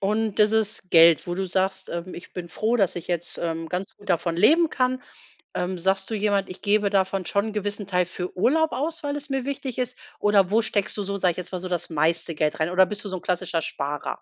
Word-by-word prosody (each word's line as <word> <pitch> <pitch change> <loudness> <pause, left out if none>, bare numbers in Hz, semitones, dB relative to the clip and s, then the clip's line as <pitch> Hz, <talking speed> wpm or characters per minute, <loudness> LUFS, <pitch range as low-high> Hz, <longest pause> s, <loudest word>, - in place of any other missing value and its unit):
Und, 210 +1 0
dieses 215 -3 +2
Geld, 165 -1 +7
wo 175 - -2
du 190 +1 -2
sagst, 190 +1 -1
ähm: 170 +2 -5
„Ich 175 - -11
bin 175 -2 -6
froh, 220 +7 0
dass 195 -6 +2
ich 175 - -6
jetzt, 175 -1 -2
ähm, 165 -1 -2
ganz 185 +2 -2
gut 205 - -16
davon 170 -1 +1
leben 315 - +5
kann.“ 255 0 0 0.5
Ähm, 180 0 -2
sagst 190 +4 0
du 225 - -1
jemand: 200 -2 0
„Ich 185 - -9
gebe 205 -1 +2
davon 190 -1 +1
schon 200 +2 +1
'n 220 - -4
gewissen 205 -1 -3
Teil 180 -2 +1
für 180 0 -6
Urlaub 315 - +3
aus, 325 +3 -3
weil 285 0 -1
es 290 0 -7
mir 270 -2 -1
wichtig 270 -2 -4
ist“ 250 0 -2 0.2
oder 200 -3 +3
wo 225 +2 +3
steckst 205 -2 -1
du 205 - -2
so, 200 +1 -3
sage 185 -2 +2
ich - - -15
jetzt 180 +1 -7
mal, 185 - -3
so 185 - -5
das 175 -1 -2
meiste 165 +2 +1
Geld 150 0 0
rein? 155 +2 0
Oder, 185 +1 +5
bist 210 +2 -5
du 205 - -4
so 185 - -3
'n 180 - -9
klassischer 180 -2 -1
Sparer? 145 0 -4
195 Hz, 250 wpm, -25 LUFS, 175-215 Hz, 0.5 s, Geld